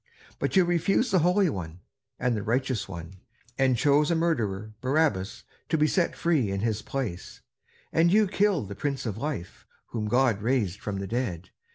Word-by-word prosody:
But -, -, -1 dB
you 185 Hz, -2 st, +6 dB
refused 195 Hz, +7 st, +1 dB
the 185 Hz, -, +4 dB
Holy 180 Hz, +4 st, +3 dB
One 90 Hz, -, -5 dB, 0.4 s
and 125 Hz, -1 st, 0 dB
the 105 Hz, -, -2 dB
Righteous 120 Hz, 0 st, -1 dB
One, 85 Hz, 0 st, -8 dB, 0.4 s
and 130 Hz, -2 st, +3 dB
chose 145 Hz, +3 st, +3 dB
a 170 Hz, -, +2 dB
murderer, 110 Hz, -, -1 dB
Barabbas, 130 Hz, -8 st, 0 dB, 0.3 s
to 160 Hz, -, +2 dB
be 150 Hz, -, +4 dB
set 170 Hz, +2 st, +1 dB
free 155 Hz, -11 st, +1 dB
in 100 Hz, 0 st, -2 dB
his 110 Hz, -1 st, -1 dB
place; 115 Hz, -10 st, -5 dB, 0.5 s
and 170 Hz, +1 st, +4 dB
you 215 Hz, +2 st, +5 dB
killed 195 Hz, -, +1 dB
the -, -, -4 dB
Prince 135 Hz, +4 st, -3 dB
of 110 Hz, -4 st, -2 dB
Life, 90 Hz, -, -5 dB, 0.2 s
whom 110 Hz, -3 st, -3 dB
God 120 Hz, -2 st, +2 dB
raised 110 Hz, -5 st, 0 dB
from 105 Hz, -2 st, -4 dB
the 95 Hz, -, -4 dB
dead. 95 Hz, -5 st, -3 dB
125 Hz, 180 wpm, -27 LUFS, 100-160 Hz, 0.5 s, you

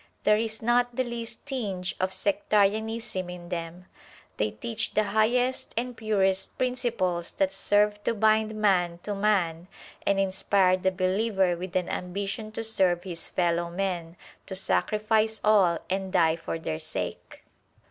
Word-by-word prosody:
There 210 Hz, -, +5 dB
is 220 Hz, 0 st, -2 dB
not 245 Hz, +1 st, +2 dB
the 255 Hz, -, +1 dB
least 235 Hz, -2 st, -6 dB
tinge 205 Hz, -10 st, -3 dB
of 185 Hz, 0 st, 0 dB
sectarianism 205 Hz, 0 st, 0 dB
in 175 Hz, -1 st, -8 dB
them. 175 Hz, 0 st, -5 dB, 0.5 s
They -, -, +1 dB
teach 225 Hz, -3 st, -4 dB
the 215 Hz, -, +4 dB
highest 245 Hz, +5 st, +1 dB
and 245 Hz, +1 st, -2 dB
purest 195 Hz, -4 st, 0 dB
principles 235 Hz, -9 st, -1 dB
that 190 Hz, -1 st, +1 dB
serve 205 Hz, +1 st, +2 dB
to -, -, +1 dB
bind 220 Hz, 0 st, +3 dB
man 180 Hz, -5 st, +2 dB
to 210 Hz, -, -3 dB
man 185 Hz, -5 st, +1 dB, 0.4 s
and 200 Hz, -1 st, +3 dB
inspire 190 Hz, -1 st, +3 dB
the 190 Hz, 0 st, +1 dB
believer 190 Hz, 0 st, +1 dB
with 180 Hz, +1 st, -7 dB
an 180 Hz, -1 st, +1 dB
ambition 200 Hz, +4 st, -4 dB
to 225 Hz, -, -3 dB
serve 185 Hz, -6 st, +1 dB
his 175 Hz, -3 st, -4 dB
fellow 170 Hz, -1 st, 0 dB
men, 175 Hz, -2 st, -3 dB, 0.3 s
to 190 Hz, -, -5 dB
sacrifice 215 Hz, +2 st, +1 dB
all 195 Hz, -6 st, +4 dB
and 190 Hz, 0 st, -2 dB
die 165 Hz, -4 st, +4 dB
for 165 Hz, 0 st, -4 dB
their 80 Hz, -, -4 dB
sake. -, -, -6 dB
195 Hz, 145 wpm, -27 LUFS, 180-220 Hz, 0.5 s, There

